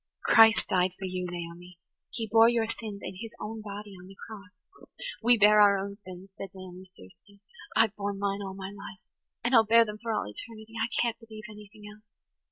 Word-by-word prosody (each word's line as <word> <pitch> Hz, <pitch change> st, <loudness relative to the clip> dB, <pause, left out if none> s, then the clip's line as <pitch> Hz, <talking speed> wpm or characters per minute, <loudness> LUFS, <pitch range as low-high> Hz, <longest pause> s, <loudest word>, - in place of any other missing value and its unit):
"Christ 225 Hz, -1 st, +6 dB
died 180 Hz, 0 st, +1 dB
for 190 Hz, -, -6 dB
you, 185 Hz, -1 st, -3 dB
Naomi. 175 Hz, +1 st, -8 dB, 0.3 s
He 225 Hz, -2 st, -5 dB
bore 225 Hz, +1 st, +6 dB
your 235 Hz, -2 st, +1 dB
sins 220 Hz, -3 st, -6 dB
in 185 Hz, 0 st, -7 dB
His 225 Hz, -, -6 dB
own 220 Hz, +1 st, -6 dB
body 205 Hz, 0 st, -8 dB
on 180 Hz, -, -13 dB
the 195 Hz, -, -13 dB
cross." 205 Hz, -2 st, -14 dB, 0.3 s
"We 240 Hz, +1 st, +5 dB
bear 210 Hz, 0 st, +6 dB
our 200 Hz, -1 st, +6 dB
own 200 Hz, +1 st, -5 dB
sins," 185 Hz, +1 st, -11 dB
said 195 Hz, -, -6 dB
Naomi 185 Hz, 0 st, -11 dB
fiercely. 200 Hz, -, -18 dB, 0.4 s
"I've 220 Hz, -2 st, +3 dB
borne 200 Hz, -1 st, -3 dB
mine 200 Hz, 0 st, -1 dB
all 190 Hz, -1 st, -6 dB
my 195 Hz, 0 st, -7 dB
life–and 205 Hz, +4 st, -8 dB
I'll 225 Hz, -2 st, +7 dB
bear 230 Hz, +1 st, +5 dB
them 210 Hz, -1 st, -7 dB
for 230 Hz, -1 st, -3 dB
all 215 Hz, -, -1 dB
eternity. 220 Hz, -, -10 dB
I 230 Hz, -, -1 dB
can't 235 Hz, -1 st, 0 dB
believe 220 Hz, -1 st, -11 dB
anything 210 Hz, 0 st, -14 dB
else. 215 Hz, 0 st, -25 dB
205 Hz, 195 wpm, -28 LUFS, 190-225 Hz, 0.4 s, I'll